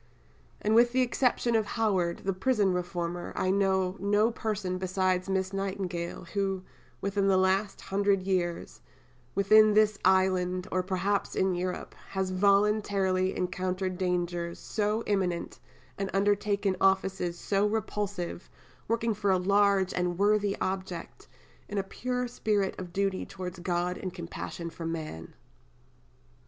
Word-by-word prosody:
And 215 - +1
with 240 +1 +5
the 260 0 +4
exception 245 -1 +1
of 220 -2 +2
Howard, 190 -6 +1
the 195 - 0
prison 200 -1 +2
reformer, 175 -1 -3
I 185 - +1
know 190 -1 +1
no 205 +4 +2
person 200 -5 -3
besides 185 0 0
Miss 190 0 0
Nightingale, 190 -3 -3
who, 195 -2 -1 0.4
within 200 0 0
the 190 -1 +4
last 190 +2 +1
hundred 200 -1 +1
years, 180 -3 -2 0.5
within 215 +2 +6
this 215 -1 +4
island, 185 -1 +2
or 185 - +1
perhaps 190 +2 -1
in 190 0 +2
Europe, 180 +1 -3 0.2
has 190 -1 -2
voluntarily 200 -1 +2
encountered 185 0 -2
dangers 175 -2 -1
so 215 +1 -1
imminent, 185 -4 -1 0.4
and 195 -1 -1
undertaken 200 0 +1
offices 190 -2 +1
so 200 +3 +1
repulsive, 205 -5 -3 0.4
working 230 0 +1
for 205 -1 -1
a 190 - +4
large 200 0 +3
and 180 -1 -1
worthy 205 0 +2
object, 185 -2 -4 0.4
in 205 - -4
a 195 - +1
pure 250 +5 -3
spirit 210 -5 0
of 180 -2 -7
duty 195 0 0
towards 185 -1 -7
God 175 0 -1
and 185 - -4
compassion 170 -1 -6
for 165 0 -6
man." 155 - -6
190 Hz, 135 wpm, -29 LUFS, 180-205 Hz, 0.5 s, within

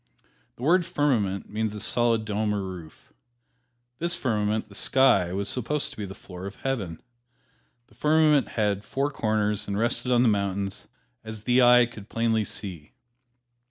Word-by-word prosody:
The 120 - -11
word 175 +5 +4
"firmament" 115 - 0
means 110 0 -2
a - - -5
solid 115 -1 +1
dome 105 0 -1
or 100 - -2
roof. 90 -4 -10 0.9
This 170 +1 -1
firmament, 110 -8 -1
the 105 - -16
sky, 100 -6 +3
was 100 +2 -2
supposed 130 +7 +1
to - - -13
be 105 - -4
the 95 0 -9
floor 90 0 -9
of 100 - -9
Heaven. 105 -12 -4 0.8
The - - -25
firmament 150 -2 +3
had 105 -2 0
four 140 +6 -2
corners 105 -4 -1
and 100 0 -2
rested 120 +3 0
on 120 0 +4
the - - +4
mountains, 100 -2 -1 0.4
as 110 -1 -8
the 125 +2 +3
eye 125 0 +7
could 110 -3 -12
plainly 115 -1 +1
see. 85 -9 -5
110 Hz, 160 wpm, -26 LUFS, 100-125 Hz, 0.9 s, eye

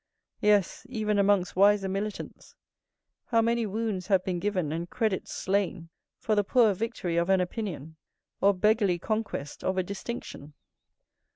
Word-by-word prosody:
_" - - -56 0.4
Yes, 205 +1 +2
even 215 -4 0
amongst 200 -2 +2
wiser 200 +1 +4
militants, 200 +2 -5 0.7
how 230 - +2
many 230 0 +1
wounds 205 -3 -3
have 190 -3 +3
been 180 -2 -1
given 185 -6 -1
and 170 +2 -4
credits 220 -5 -1
slain, 190 -3 -1 0.3
for 220 - -1
the 205 -1 +3
poor 225 0 +4
victory 190 -4 -3
of 170 +2 +1
an 190 -1 +4
opinion, 175 - -4 0.4
or 200 - +6
beggarly 205 -1 +2
conquest 215 -7 -4
of 190 0 -1
a 185 - +2
distinction! 190 -6 -7
200 Hz, 150 wpm, -28 LUFS, 180-215 Hz, 0.7 s, or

